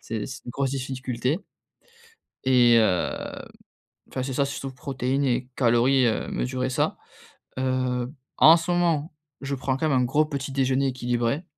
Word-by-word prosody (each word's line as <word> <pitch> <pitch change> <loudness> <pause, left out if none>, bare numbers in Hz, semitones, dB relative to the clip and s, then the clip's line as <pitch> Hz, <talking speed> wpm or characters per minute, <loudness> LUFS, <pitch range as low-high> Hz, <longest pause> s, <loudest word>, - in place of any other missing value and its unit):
C'est 110 -2 -4
c'est 135 - -9
une - - -6
grosse 135 0 -1
difficulté 130 - -2 1.0
et 125 -2 +5
heu, 95 -5 0 0.8
enfin 130 - -4
c'est 135 +1 -3
ça 140 +2 +1
surtout 140 -1 -5
protéines 135 +1 -2
et 125 -1 0
calories, 125 +1 +3
heu, 110 - -1
mesurer 130 0 -2
ça. - - 0 0.6
Heu, 130 -1 -1 0.3
en 160 +2 +8
ce 165 +1 -3
moment, 165 -3 +1 0.3
je 140 0 -3
prends 130 0 -1
quand 155 +3 0
même 135 - +3
un 125 - +2
gros 145 +5 +2
petit 140 -2 -4
déjeuner 135 0 +1
équilibré. 125 +3 -1
130 Hz, 155 wpm, -25 LUFS, 125-140 Hz, 1.0 s, en